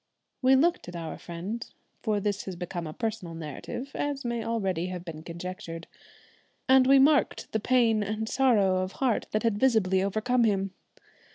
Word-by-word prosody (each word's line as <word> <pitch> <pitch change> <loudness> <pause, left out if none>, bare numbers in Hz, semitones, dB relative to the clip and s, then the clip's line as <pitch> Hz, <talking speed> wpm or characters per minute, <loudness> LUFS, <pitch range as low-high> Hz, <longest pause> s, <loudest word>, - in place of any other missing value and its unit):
We 260 0 +6
looked 335 - +2
at 175 - -8
our 165 -2 -5
friend 185 +7 -5 0.4
for 215 -3 0
this 205 0 -2
has 190 - -5
become 175 -1 -5
a - - -5
personal 215 -7 -4
narrative, 165 - -6
as 285 -2 -3
may 235 -1 -1
already 195 -7 -1
have 180 -1 -6
been 160 -2 -7
conjectured 170 0 -7 0.8
and 260 -1 +6
we 275 +1 +7
marked 285 +2 +3
the 220 - 0
pain 230 -2 +3
and 215 +2 -2
sorrow 220 -8 +3
of 185 +1 -2
heart 255 -5 0
that 215 - -1
had 225 -3 +1
visibly 210 -7 +3
overcome 220 +5 +1
him. 195 -3 +1
210 Hz, 170 wpm, -28 LUFS, 185-245 Hz, 0.8 s, we